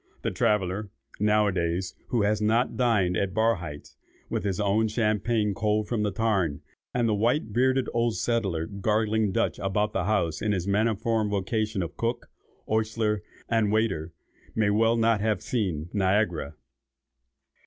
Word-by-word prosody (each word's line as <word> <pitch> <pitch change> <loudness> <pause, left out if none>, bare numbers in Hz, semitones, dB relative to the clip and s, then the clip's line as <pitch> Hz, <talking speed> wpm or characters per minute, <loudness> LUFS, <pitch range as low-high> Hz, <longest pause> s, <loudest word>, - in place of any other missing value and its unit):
The - - 0
traveller, 100 0 0 0.3
now 105 +1 +3
a 100 - +2
days, 90 +1 -1
who 115 -4 +1
has 105 +1 +1
not 115 +4 +2
dined 105 -8 +2
at 95 +1 -1
Barhydt's, 90 -10 -1 0.3
with - - -1
his 95 -2 -1
own 105 +2 +2
champagne 110 -1 +1
cold 105 +1 0
from 115 -1 -1
the 105 - +1
tarn, 95 -7 0 0.3
and 120 -2 +1
the 110 - +2
white 115 +8 +2
headed 130 +1 +2
old 115 -1 +1
settler 100 -9 0
'gargling' 105 +2 0
Dutch - - 0
about 105 +2 0
the 95 -2 -1
house 85 -7 0
in 105 -1 +1
his 90 -1 -2
maniform 110 +1 +1
vocation 105 0 -1
of 85 - -7
cook, 120 +1 -2 0.4
ostler, 110 -1 0 0.3
and 110 -3 +2
waiter, 95 -7 0 0.4
may 110 -2 +2
as - - +2
well 115 +2 +3
not 115 -2 +2
have 105 -4 0
seen 90 -10 -2
Niagara." 95 -7 +1
105 Hz, 155 wpm, -27 LUFS, 95-110 Hz, 0.4 s, now